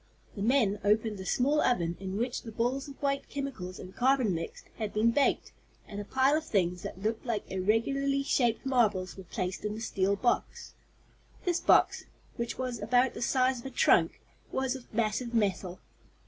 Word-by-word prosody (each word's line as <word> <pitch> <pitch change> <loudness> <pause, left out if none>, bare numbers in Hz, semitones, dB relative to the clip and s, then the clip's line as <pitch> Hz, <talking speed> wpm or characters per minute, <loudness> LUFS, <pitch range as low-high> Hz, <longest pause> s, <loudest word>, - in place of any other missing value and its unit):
The 200 - -5
men 220 -3 +2
opened 210 0 +1
the 190 - -6
small 285 +8 +2
oven 175 -8 +1
in 190 0 -4
which 240 +2 -2
the 225 - -8
balls 245 +5 -1
of 280 - -11
white 275 0 -1
chemicals 260 -11 -5
and 185 +1 -10
carbon 255 -5 +3
mixed, 165 0 -5
had 215 -3 -3
been 225 +2 +4
baked, 275 +4 +1 0.4
and 205 0 -6
a - - -8
pile 265 +5 +3
of 315 - 0
things, 180 - 0
that 190 - -7
looked 220 +1 -1
like 230 -5 -2
irregularly 275 +9 +1
shaped 240 -4 +1
marbles, 215 -8 +1
were 190 - -10
placed 185 +1 -4
in 210 0 -2
the - - -6
steel 200 -3 0
box. 240 +4 -1 0.7
This 350 -1 +1
box, - - +3 0.3
which 235 0 -3
was 255 -3 -3
about 245 +4 +2
the - - -7
size 255 0 +2
of 235 - -13
a - - -5
trunk, - - +3 0.3
was 265 0 -1
of 260 -2 -11
massive 230 +2 -1
metal. 190 -4 0
230 Hz, 185 wpm, -30 LUFS, 200-260 Hz, 0.7 s, been